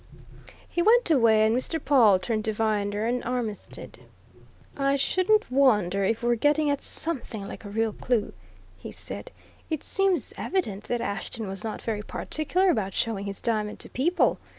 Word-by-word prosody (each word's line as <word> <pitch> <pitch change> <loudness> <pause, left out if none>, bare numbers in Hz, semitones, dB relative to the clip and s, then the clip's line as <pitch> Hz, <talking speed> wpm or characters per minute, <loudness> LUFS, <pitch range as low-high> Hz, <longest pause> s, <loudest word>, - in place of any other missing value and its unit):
He 345 - -1
went 450 0 +4
away, 225 -6 +5
and 220 +1 +2
Mr. 290 +6 0
Pawle 245 -10 +5
turned 215 +4 -2
to 220 - +1
Viner 210 -1 0
and 245 +2 -1
Armitstead. 240 -4 -5 0.8
"I 275 0 +1
shouldn't 370 +7 +2
wonder 210 -8 +3
if 225 +4 0
we're 240 0 +3
getting 295 +5 +2
at 285 - -1
something 235 -10 -3
like 210 - -9
a - - -6
real 220 +1 0
clue," 235 -2 -1 0.5
he - - -8
said. - - -6 0.4
"It 315 -3 -2
seems 390 -2 0
evident 215 - -2
that 240 -1 -2
Ashton 210 +2 -4
was 190 -1 -6
not 220 -1 -5
very 215 -2 -2
particular 355 - 0
about 195 - -2
showing 215 -4 -1
his 200 -1 -6
diamond 215 -2 -1
to - - -6
people! 340 +8 +1
230 Hz, 165 wpm, -26 LUFS, 210-290 Hz, 0.8 s, away